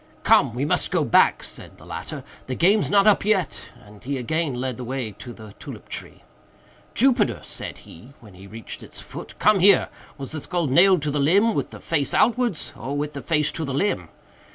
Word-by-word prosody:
"Come! 115 - +4
we 130 +3 -1
must 150 - +2
go - - +1
back," - - +3
said - - -8
the - - -16
latter, - - -6 0.2
"the 130 - -3
game's 200 +8 +3
not 200 -1 +4
up 210 -2 +4
yet;" 200 -5 0 0.2
and 105 0 -16
he 140 +1 -3
again 150 +3 -2
led 125 -1 -3
the 130 - -6
way 125 -2 -4
to 125 - -8
the 110 -3 -12
tulip - - -10
tree. - - -8 0.7
"Jupiter," 245 -3 +3
said - - -7
he, 120 +11 -14
when 105 -4 -16
we 95 +2 -13
reached 110 +3 -9
its - - -10
foot, - - -10
"come 210 -1 +4
here! 195 +2 +5 0.3
was 135 -2 -5
the 155 -1 -5
skull 175 +1 -2
nailed 175 +4 +4
to 150 - -1
the 145 - -1
limb 200 +11 +3
with - - -2
the - - -11
face 150 -4 -1
outwards, 240 -6 +1
or 140 +4 -5
with 150 +1 -3
the 140 - -6
face 150 -1 +1
to 165 - -4
the 135 -3 -3
limb?" 205 +8 -1
150 Hz, 210 wpm, -23 LUFS, 130-195 Hz, 0.7 s, here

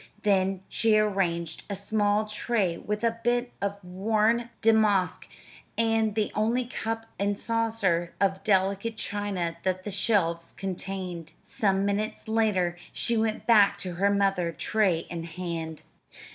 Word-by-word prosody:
Then 190 -2 +2
she 220 -2 +3
arranged 175 -6 0
a 200 - -2
small 205 +1 +1
tray 210 -4 0
with 210 +5 -4
a 230 0 +1
bit 240 +1 +1
of 200 0 -1
worn 215 +6 +1
damask 215 -4 +3 0.5
and 225 -2 +2
the 215 -1 0
only 230 +4 +1
cup 225 -1 -4
and 200 0 0
saucer 220 -8 0
of 195 0 +1
delicate 200 +2 +1
china 190 -5 -2
that 185 0 -1
the 205 - -4
shelves 185 -5 +1
contained. 185 -3 -5
Some 195 -2 0
minutes 205 +2 -2
later 210 -6 +1
she 235 - -1
went 220 -1 0
back 210 -4 +5
to 180 -2 -4
her 195 +4 +2
mother, 195 -4 +1
tray 190 -1 +1
in 165 -1 -4
hand. 165 -2 -5
200 Hz, 135 wpm, -27 LUFS, 185-220 Hz, 0.5 s, back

